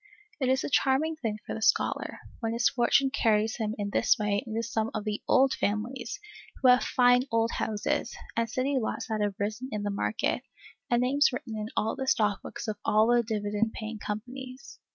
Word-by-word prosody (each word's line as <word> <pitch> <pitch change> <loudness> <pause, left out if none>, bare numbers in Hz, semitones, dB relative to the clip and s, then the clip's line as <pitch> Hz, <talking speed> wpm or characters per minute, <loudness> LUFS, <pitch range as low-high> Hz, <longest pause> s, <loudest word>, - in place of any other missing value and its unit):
It 260 -2 +1
is 260 0 +2
a - - -2
charming 275 +5 +2
thing 225 -8 -3
for - - -4
the 220 - -5
scholar, 220 - +1 0.2
when 225 -1 -2
his 235 +1 +3
fortune 265 +2 +3
carries 220 -2 +2
him 220 -2 -2
in 200 -1 -3
this 235 - +3
way 205 -2 0
into 225 +1 -2
some 225 -1 -1
of 215 - -2
the 210 0 -3
"old 265 +1 +4
families" 235 +4 -2 0.4
who 260 - +3
have 250 0 +6
fine 245 0 +4
old 230 0 +2
houses, 210 -2 -1 0.2
and 230 0 0
city 260 +3 0
lots 220 - -3
that 215 -1 -1
have 205 -1 0
risen 215 +5 -3
in 210 -1 -3
the 205 - -1
market, 200 +2 -1 0.5
and 240 0 +3
names 280 +3 +4
written 245 -2 -5
in 215 0 -4
all 220 - +1
the 265 - -4
stock 210 -5 +2
books - - -7
of 215 -1 -3
all 220 +3 +4
the 240 - +5
dividend 210 0 -1
paying 220 0 -6
companies. 255 +6 -7
225 Hz, 200 wpm, -28 LUFS, 215-255 Hz, 0.5 s, have